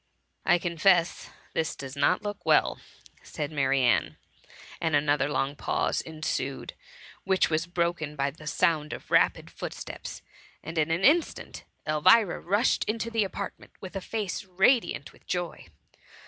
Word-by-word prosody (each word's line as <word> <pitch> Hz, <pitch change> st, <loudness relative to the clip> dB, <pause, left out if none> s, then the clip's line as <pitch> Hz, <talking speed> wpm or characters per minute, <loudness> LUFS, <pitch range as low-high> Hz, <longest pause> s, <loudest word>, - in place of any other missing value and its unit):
*" -, -, -45 dB
^* -, -, +5 dB
I 175 Hz, -, +6 dB
confess 170 Hz, 0 st, +2 dB, 0.2 s
this 160 Hz, -1 st, -1 dB
does 135 Hz, 0 st, -8 dB
not 180 Hz, +7 st, +2 dB
look 205 Hz, -1 st, -5 dB
well,^ -, -, +3 dB, 0.4 s
said 150 Hz, -1 st, -5 dB
Ma* 145 Hz, -2 st, -1 dB
rianne, 130 Hz, -4 st, +2 dB, 0.7 s
and 160 Hz, -2 st, +1 dB
another 145 Hz, 0 st, +2 dB
long 140 Hz, 0 st, -1 dB
pause -, -, 0 dB
ensued, 155 Hz, -4 st, -4 dB, 0.5 s
which 190 Hz, -3 st, +2 dB
was 160 Hz, +2 st, 0 dB
broken 170 Hz, -3 st, -1 dB
by 140 Hz, -1 st, 0 dB
the 155 Hz, +1 st, -13 dB
sound 155 Hz, -3 st, +1 dB
of -, -, -9 dB
rapid -, -, +3 dB
footsteps, -, -, -7 dB, 0.4 s
and 165 Hz, 0 st, -3 dB
in 155 Hz, +1 st, +1 dB
an 165 Hz, +3 st, 0 dB
instant 315 Hz, -, +2 dB, 0.2 s
Elvira 175 Hz, +7 st, +4 dB
rushed 205 Hz, +7 st, +2 dB
into 230 Hz, +1 st, -2 dB
the 225 Hz, -2 st, +2 dB
apartment 200 Hz, +1 st, -6 dB
with 190 Hz, 0 st, -9 dB
a 195 Hz, -, -2 dB
face 210 Hz, 0 st, -3 dB
radiant 190 Hz, -, +2 dB
with -, -, -23 dB
joy. 175 Hz, -2 st, -3 dB
165 Hz, 150 wpm, -27 LUFS, 150-190 Hz, 0.7 s, I